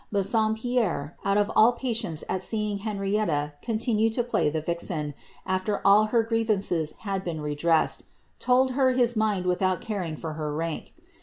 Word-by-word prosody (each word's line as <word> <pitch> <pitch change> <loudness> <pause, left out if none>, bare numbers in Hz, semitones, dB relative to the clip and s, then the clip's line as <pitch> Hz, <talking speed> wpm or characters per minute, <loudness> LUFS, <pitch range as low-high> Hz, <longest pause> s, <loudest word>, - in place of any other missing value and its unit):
Bassompierre, 215 - 0
out 195 0 +2
of 205 0 +1
all 230 +3 +6
patience 230 -10 -2
at 190 - -2
seeing 210 0 -1
Henrietta 195 -8 -1
con 225 -2 -1 0.5
lay - - +3
the 160 +1 -2
vixen, 165 -3 -2 0.3
afler 185 +2 0
all 205 +2 +6
her 225 +1 +2
grievances 215 -8 0
had 195 -3 -3
been 170 -4 -4
redressed, 150 +2 +1 0.3
told 255 +1 +3
ind 240 -7 +2
without 180 0 +1
caring 185 -8 -4
for 160 +1 -6
her 150 -1 -4
rank. 165 0 -4
200 Hz, 140 wpm, -26 LUFS, 165-220 Hz, 0.5 s, all